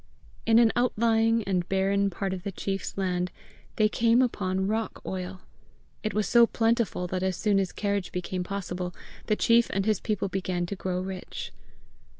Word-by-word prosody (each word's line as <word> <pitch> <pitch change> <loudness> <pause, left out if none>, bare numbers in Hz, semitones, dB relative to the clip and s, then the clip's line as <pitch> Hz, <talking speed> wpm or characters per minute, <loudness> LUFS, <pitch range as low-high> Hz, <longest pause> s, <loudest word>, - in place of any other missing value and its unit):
In 225 0 +6
an 230 -1 +6
outlying 225 -1 +2
and 185 -3 -1
barren 195 +1 +2
part 195 +1 -3
of 185 - -5
the 200 +2 -4
chief's 195 +1 -4
land, 180 -2 0 0.5
they 215 - +4
came 230 +3 +3
upon 190 -5 -1
rock 220 +1 -2
oil. 185 0 -5 0.6
It 215 -3 -3
was 210 -3 +1
so 235 +2 +6
plentiful 225 -5 +1
that 185 +1 -2
as 190 -1 0
soon 205 -2 +2
as 190 -2 -1
carriage 200 -2 -2
became 180 0 -3
possible, 180 -2 -4 0.3
the 215 - +3
chief 235 +2 +4
and 195 0 -1
his 215 -3 +2
people 210 -2 -1
began 185 -2 -2
to 200 - -4
grow 185 -1 -2
rich. 185 0 -6
195 Hz, 170 wpm, -27 LUFS, 185-220 Hz, 0.6 s, In